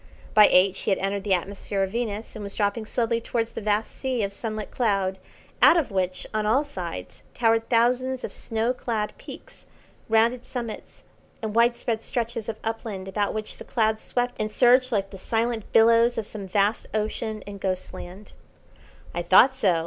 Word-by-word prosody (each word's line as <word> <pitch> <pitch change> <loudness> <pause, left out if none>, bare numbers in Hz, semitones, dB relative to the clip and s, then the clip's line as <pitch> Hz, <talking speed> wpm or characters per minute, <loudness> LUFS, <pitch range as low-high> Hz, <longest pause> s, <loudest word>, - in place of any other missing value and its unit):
By 210 -1 +8
eight 185 +1 +4
she - - -2
had 195 - +3
entered 195 0 -2
the 195 -2 +3
atmosphere 195 +2 -3
of 190 - -2
Venus, 225 -1 -3
and 215 - -6
was 200 -1 -7
dropping 210 +1 -1
slowly 230 0 0
towards 230 0 -2
a - - -4
vast 210 +1 0
sea 255 -4 -1
of 200 0 -2
sunlit 215 0 -5
cloud, 195 -5 0 0.4
out 345 - +8
of 295 -9 0
which, 185 -1 -1
on 215 0 0
all 230 +7 +3
sides, 175 - -7
towered 225 -1 +2
thousands 250 +2 +2
of - - -5
snow 225 +2 -1
clad 225 -4 -3
peaks, - - -12 0.4
rounded 230 +2 +3
summits, 235 -4 -7 0.4
and 215 -1 -2
widespread 235 -1 +2
stretches 230 -2 -3
of 220 - -4
upland 220 -4 -4
about 205 +2 -1
which 215 -1 -5
the - - -9
clouds 220 -2 0
swept 245 0 -2
and 215 0 -1
surged 255 +3 +4
like 195 -3 -1
the 195 - -9
silent 225 +1 -1
billows 230 +1 +5
of 225 - -2
some 200 -2 -7
vast 205 +3 +1
ocean 215 0 -2
in 200 -1 -9
Ghostland. 185 +1 -5 0.8
"I 175 - -2
thought 190 +9 +6
so!" 200 -10 +2
220 Hz, 180 wpm, -25 LUFS, 200-235 Hz, 0.8 s, By